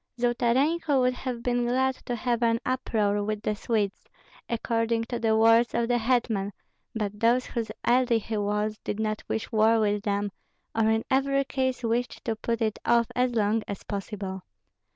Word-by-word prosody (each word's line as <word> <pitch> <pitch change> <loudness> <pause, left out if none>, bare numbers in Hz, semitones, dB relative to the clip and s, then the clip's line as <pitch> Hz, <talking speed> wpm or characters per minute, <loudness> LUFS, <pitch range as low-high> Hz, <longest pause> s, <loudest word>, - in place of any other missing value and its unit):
Zolotarenko 265 +6 +2
would 250 0 +3
have 250 -2 -5
been 245 0 +1
glad 260 +2 +2
too - - -21
to 245 - -1
have 240 0 -1
an 230 -1 +2
"uproar" 210 -5 0
with 210 0 -3
the 215 - 0
Swedes, 210 -2 -1 0.4
according 230 0 0
to 235 +1 -4
the 220 -1 +2
words 230 +1 +5
of 235 0 +1
the 240 0 +2
hetman; 225 -4 0 0.4
but 210 -2 -3
those 240 +3 +3
whose 230 -3 -3
ally 245 -1 +3
he 220 0 -3
was 210 +1 -1
did 205 - -3
not 215 -1 -1
wish 220 - -3
war 225 0 +4
with 210 -1 +1
them, 205 -1 -1 0.4
or 220 -1 +2
in 220 0 +1
every 275 +1 +2
case 260 -2 -2
wished 235 +2 -1
to 225 - 0
put 230 +1 -2
it 215 -1 -1
off 235 0 +4
as 250 -1 +1
long 215 0 +2
as 200 - -6
possible. 195 -2 -5
230 Hz, 180 wpm, -27 LUFS, 215-245 Hz, 0.4 s, words